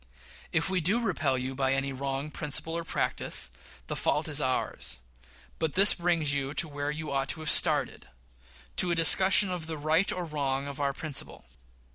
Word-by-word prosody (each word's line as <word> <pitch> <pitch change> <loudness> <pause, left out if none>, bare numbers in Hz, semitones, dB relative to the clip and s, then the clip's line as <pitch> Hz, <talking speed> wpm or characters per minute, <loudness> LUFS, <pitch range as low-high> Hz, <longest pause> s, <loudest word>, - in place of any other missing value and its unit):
If - - +1
we 185 -1 +1
do 195 +9 +2
repel 160 - -1
you 130 +1 -4
by 135 0 0
any 135 0 -2
wrong 135 +2 -4
principle 150 +3 -3
or 170 - -3
practice, 65 - -1 0.3
the - - -5
fault - - 0
is 150 -1 +4
ours; 130 - -2 0.6
but 160 -2 -2
this 200 +3 +7
brings 170 -5 0
you 140 +1 -3
to 170 - +4
where 145 -1 -4
you 150 0 -5
ought 135 0 -2
to - - -4
have 155 - +2
started - - +3 0.7
to 180 - +4
a 170 - +1
discussion 190 +4 +5
of 175 -3 -5
the 160 -1 -5
right 155 +5 +1
or 180 -1 -4
wrong 140 -3 -3
of 140 0 -6
our 140 -1 0
principle. 150 0 -4
150 Hz, 185 wpm, -28 LUFS, 135-170 Hz, 0.7 s, this